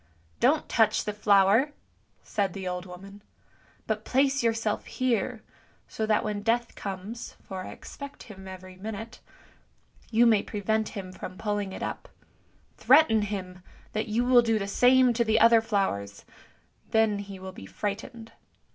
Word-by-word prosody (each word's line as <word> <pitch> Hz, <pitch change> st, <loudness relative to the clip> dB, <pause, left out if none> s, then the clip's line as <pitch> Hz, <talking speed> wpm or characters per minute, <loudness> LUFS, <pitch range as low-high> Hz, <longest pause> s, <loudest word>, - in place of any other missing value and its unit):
" 80 Hz, -1 st, -36 dB
Don't -, -, 0 dB
touch -, -, +2 dB
the 210 Hz, -, -3 dB
flower," 210 Hz, +6 st, +4 dB, 0.5 s
said 195 Hz, -3 st, -1 dB
the 190 Hz, -2 st, -5 dB
old 180 Hz, +1 st, -4 dB
woman, 195 Hz, +3 st, -11 dB, 0.3 s
" -, -, -33 dB
but 215 Hz, -1 st, -2 dB
place 275 Hz, +3 st, +2 dB
yourself 225 Hz, -2 st, 0 dB
here, 245 Hz, -2 st, -1 dB, 0.4 s
so 220 Hz, -, -3 dB
that 215 Hz, -1 st, +2 dB
when 210 Hz, -1 st, -3 dB
Death 230 Hz, +2 st, 0 dB
comes 200 Hz, +5 st, -7 dB
(for 190 Hz, -1 st, -6 dB
I -, -, -7 dB
expect 280 Hz, 0 st, -10 dB
him 190 Hz, -3 st, -12 dB
every 185 Hz, 0 st, -10 dB
minute) 220 Hz, +3 st, -7 dB, 0.9 s
you 235 Hz, +1 st, +4 dB
may 220 Hz, -3 st, +5 dB
prevent 220 Hz, +1 st, -1 dB
him 185 Hz, -2 st, -6 dB
from 185 Hz, 0 st, -8 dB
pulling 205 Hz, -2 st, -2 dB
it -, -, -6 dB
up; -, -, -5 dB, 0.7 s
threaten 265 Hz, -5 st, +5 dB
him 185 Hz, -3 st, -5 dB, 0.3 s
that 215 Hz, +1 st, -2 dB
you 230 Hz, +3 st, 0 dB
will 250 Hz, -1 st, +6 dB
do 225 Hz, -2 st, +1 dB
the 200 Hz, -2 st, -3 dB
same 250 Hz, +4 st, +5 dB
to 235 Hz, +1 st, +2 dB
the 220 Hz, 0 st, +2 dB
other 230 Hz, 0 st, +6 dB
flowers, 190 Hz, -, -2 dB, 0.6 s
then 220 Hz, -2 st, +2 dB
he 200 Hz, -1 st, -8 dB
will 190 Hz, 0 st, -8 dB
be 95 Hz, -, -11 dB
frightened. 225 Hz, -, -5 dB
210 Hz, 160 wpm, -27 LUFS, 195-230 Hz, 0.9 s, will